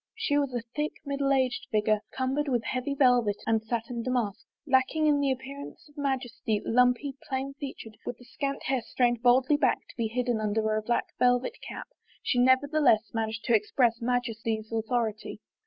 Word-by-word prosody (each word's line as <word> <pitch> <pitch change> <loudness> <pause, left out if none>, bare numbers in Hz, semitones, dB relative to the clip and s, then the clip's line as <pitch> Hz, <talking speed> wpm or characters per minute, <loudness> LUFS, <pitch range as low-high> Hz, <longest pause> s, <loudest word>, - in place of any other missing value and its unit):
She 450 -10 0
was 285 -2 +1
a 235 - -2
thick, 300 +1 -1
middle 280 0 0
aged 260 -2 +1
figure, 215 0 +2
cumbered 265 +3 -1
with 245 -4 +1
heavy 255 +3 -2
velvet 245 -6 +4
and 225 -1 +2
satin 230 +1 -3
damask. 235 -4 -2 0.2
Lacking 270 +3 +2
in 295 -1 +4
the 280 -1 +1
appear 265 +2 -5
ance 285 - -11
of 295 - -22
majesty, 255 -6 -1
lumpy, 250 +4 +3 0.2
plain 270 +1 -2
featured, 230 -6 -7
with 240 - -5
the 245 - -16
scant 275 +2 -4
hair 265 -2 0
strained 240 0 0
baldly 255 +4 +4
back 265 -4 +2
to - - -14
be 230 -2 0
hidden 240 0 -1
under 215 +1 0
a 215 - 0
black 235 +2 0
vel 245 0 +5
vet 255 - -7
cap, - - -7 0.4
she 245 - +1
nevertheless 260 -3 +4
managed 225 0 -2
to 235 - +3
express 230 +2 +2
majesty's 230 -3 -2
authority. 225 -1 -2
245 Hz, 180 wpm, -28 LUFS, 225-275 Hz, 0.4 s, vel